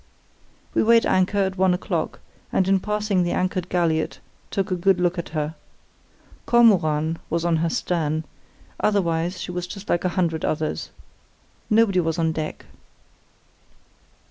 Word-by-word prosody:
"We - - +3
weighed 230 +1 +5
anchor 185 +2 +2
at 190 -1 0
one 185 -1 +4
o'clock, 180 - -3 0.3
and 190 - +2
in 195 0 +3
passing 210 -1 0
the 175 - 0
anchored 185 -1 -1
galliot 165 -3 0 0.3
took 195 0 -2
a - - +2
good 185 +1 +2
look 180 0 +1
at 170 - -5
her. 155 0 -2 0.9
Kormoran 165 -9 +3
was 170 +1 -1
on 170 -1 +2
her 165 +1 0
stern; 160 -2 -1 0.6
otherwise 180 -3 0
she 180 - -5
was 180 0 -4
just 200 +3 -9
like 175 - +1
a 185 - +1
hundred 165 -3 0
others. 155 0 -2 0.8
Nobody 215 -4 +4
was 165 -1 0
on 165 -1 +1
deck. 155 -1 -5
180 Hz, 145 wpm, -23 LUFS, 165-195 Hz, 0.9 s, weighed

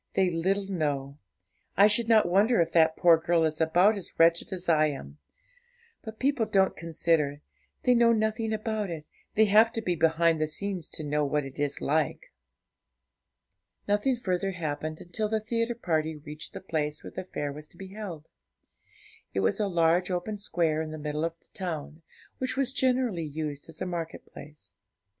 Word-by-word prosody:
they 190 -2 +3
little 190 +4 0
know; 145 -6 -2 0.6
I 200 - +8
should 215 +2 +3
not 220 -5 +5
wonder 200 +6 +3
if 165 -1 +2
that 160 -1 +4
poor 170 -2 +6
girl 165 0 +2
is 155 0 -1
about 175 +7 +4
as 200 - -6
wretched 165 +4 +3
as 185 -1 -5
I 155 -2 +4
am. 75 - -7 0.8
But 220 -1 -9
people 260 -4 +1
don't 195 -2 +2
consider; 160 -3 0 0.4
they 250 - +5
know 235 -1 +5
nothing 220 0 0
about 215 -2 -2
it; 160 -3 -6 0.3
they 220 - +5
have 215 +3 +5
to - - -2
be 180 -3 0
behind 165 0 +2
the 155 - +2
scenes 185 +1 -4
to 155 - -4
know 150 0 0
what 145 0 0
it 135 +1 -10
is 145 -1 -2
like.' 155 0 -1 1.5
Nothing 210 +6 +2
further 195 -4 -2
happened 155 -2 -4
until 210 +5 -3
the 220 0 +1
theatre 230 +2 -1
party 160 -7 -1
reached 150 +1 -10
the - - -7
place 150 -4 -3
where - - -8
the - - -5
fair 145 -5 -4
was 150 +1 -10
to - - -20
be 190 -1 -9
held. 190 -7 -7 1.1
It 95 - +1
was 95 - +1
a 210 - +1
large 170 0 +2
open 185 +4 -2
square 165 -5 0
in 160 - -4
the 155 - -6
middle 150 0 -3
of 165 0 -3
the - - -28
town, 160 -4 -5 0.4
which 260 0 -2
was 270 -1 0
generally 250 -9 +1
used 150 -1 -5
as 160 - -7
a - - -3
market 170 -3 -5
place. 150 +1 -13
170 Hz, 185 wpm, -28 LUFS, 155-210 Hz, 1.5 s, I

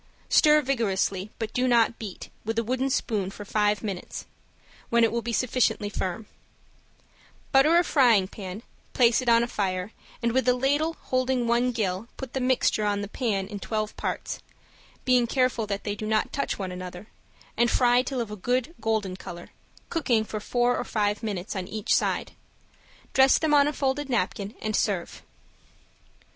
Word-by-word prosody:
Stir 300 0 +5
vigorously, 200 -6 0
but 220 -1 -4
do 255 +1 +1
not 235 -2 +3
beat, 205 -5 -7
with 225 +1 -3
a 230 - +2
wooden 260 +4 -1
spoon 215 -7 -1
for 205 +1 -9
five 210 +1 +1
minutes, 195 -4 -5 0.6
when 235 0 +4
it 225 - +4
will 235 +1 -1
be 235 +1 -4
sufficiently 235 -3 +1
firm; 190 +1 -3 1.3
butter 295 +5 +5
a 350 - +5
frying 240 - +4
pan, 195 +1 -8 0.3
place 240 0 +4
it 250 - 0
on 230 0 +5
a - - -1
fire, 190 -3 -2 0.3
and 235 - +2
with 260 +2 +1
a 250 - +4
ladle 290 +5 +1
holding 255 -1 0
one 240 +2 +2
gill 210 -2 -2
put 265 -3 -7
the 265 - -1
mixture 250 -4 +2
on 205 -1 0
the 205 - -4
pan 205 -4 -1
in 205 -1 -6
twelve 215 +1 -3
parts, - - -4 0.7
being 250 -2 +4
careful 250 -3 +1
that 200 -1 -3
they 205 - -2
do 215 +1 -5
not 215 0 0
touch 280 - -1
one 190 -2 -4
another, 180 +1 -7 0.5
and 235 +1 +3
fry 245 0 +4
till 255 -1 -3
of 225 -3 -5
a - - -4
good 250 - -1
golden 215 -4 -1
color, 175 -1 -9 0.4
cooking 255 -9 +1
for 215 0 -5
four 245 +3 +1
or - - -1
five 210 -1 -1
minutes 205 -3 -4
on 185 -2 -3
each 215 0 0
side. - - 0 0.8
Dress 265 0 +6
them 315 -2 +1
on 285 -1 +6
a - - +1
folded 280 0 -1
napkin, 205 -2 -1
and 215 -1 -1
serve. 190 -5 -1
230 Hz, 180 wpm, -26 LUFS, 205-255 Hz, 1.3 s, Dress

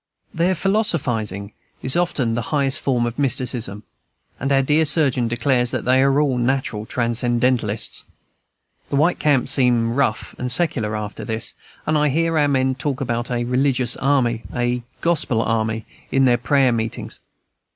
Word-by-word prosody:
Their 175 +3 +1
philosophizing 125 - -1 0.3
is 130 - -1
often 150 -9 0
the 120 - -1
highest 140 -1 +2
form 125 -3 +1
of 120 +3 -5
mysticism; 120 -6 0 0.6
and 140 +2 -2
our 135 -1 +3
dear 150 +4 +3
surgeon 140 -6 +2
declares 120 +1 +1
that - - -3
they 130 +1 +4
are 135 +1 +3
all 135 -4 +1
natural 120 -4 -1
transcendentalists. 120 -2 0 0.9
The - - -2
white 160 +5 +2
camps 140 -3 +2
seem 120 -4 +3
rough 125 -4 -1
and 125 0 -1
secular, 120 -9 +1
after 105 0 -5
this; 110 -2 -2 0.3
and 155 0 +1
I 150 0 +2
hear 165 +2 +1
our 145 - +3
men 130 -2 +1
talk 135 0 -3
about 120 -2 -2
"a 120 -1 -1
religious 125 0 +2
army," 130 -4 +1
"a 120 0 0 0.2
Gospel 155 -8 +1
army," 110 0 -1 0.3
in 135 0 +3
their 120 -1 +3
prayer 135 +1 +2
meetings. 115 -1 -4
125 Hz, 155 wpm, -21 LUFS, 115-140 Hz, 0.9 s, they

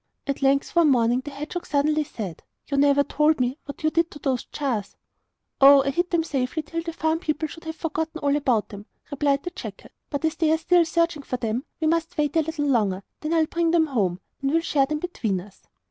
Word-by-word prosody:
At 275 0 -3
length, 275 +3 +2
one 335 -3 +5
morning, 240 -2 +3
the 290 - -6
hedgehog 300 +5 -6
suddenly 300 +1 +2
said: 205 - -7 0.2
'You 280 - -3
never 285 0 +4
told 300 +1 +2
me 255 +4 0
what 285 - -9
you 310 - +2
did 335 +1 +1
with 295 - -12
those 260 -3 0
jars?' 240 -9 -3 0.6
'Oh, 275 0 +9
I 275 - 0
hid 350 +5 0
them 335 -2 +1
safely 275 0 -2
till 330 +2 -4
the 330 0 -5
farm 320 0 0
people 315 -2 -2
should 325 +2 -12
have 320 0 -5
forgotten 320 0 -3
all 285 -1 +1
about 255 -7 +1
them,' 205 +1 -10 0.2
replied 280 -1 +1
the 355 - -4
jackal. - - -9 0.2
'But 285 +2 -2
as 320 0 -1
they 320 -2 +2
are 320 - +4
still 340 +1 +3
searching 335 -2 0
for 255 -2 -4
them 235 +2 -2
we 320 - -1
must 330 +2 0
wait 295 0 0
a 325 - +5
little 315 -1 -2
longer, 220 -9 +2
and 190 - -10 0.2
then 310 +2 -2
I'll 320 -1 +4
bring 335 +1 0
them 330 -1 +4
home, 200 - -1 0.2
and 275 - 0
we 305 - +1
will 330 - +3
share 275 -4 +2
them 305 +1 -1
between 240 - -2
us. 195 +2 -14
295 Hz, 240 wpm, -24 LUFS, 270-320 Hz, 0.6 s, Oh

